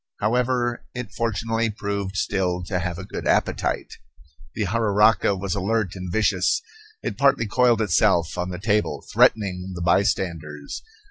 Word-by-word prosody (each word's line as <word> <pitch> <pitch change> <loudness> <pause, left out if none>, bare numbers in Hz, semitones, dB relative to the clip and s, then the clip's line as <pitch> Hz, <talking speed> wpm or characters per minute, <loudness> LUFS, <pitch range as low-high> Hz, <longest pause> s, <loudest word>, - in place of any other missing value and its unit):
However, 120 +2 0
it 125 -4 -5
fortunately 115 0 -1
proved 100 -2 -4
still 90 -3 0
to 90 0 -2
have 85 0 -3
a 95 - -7
good - - -5
appetite. - - 0 0.6
The 105 - -1
jararaca 105 -1 +3
was 95 0 -3
alert 100 -1 -1
and 90 -1 -6
vicious. 95 -2 +1 0.4
It - - -4
partly 140 -4 +4
coiled 120 +1 +3
itself 90 -3 +2
on 90 +1 -2
the 90 - -5
table, 105 +2 0
threatening 95 -3 +2
the 85 - -5
bystanders. 85 -5 0
100 Hz, 140 wpm, -23 LUFS, 90-115 Hz, 0.6 s, partly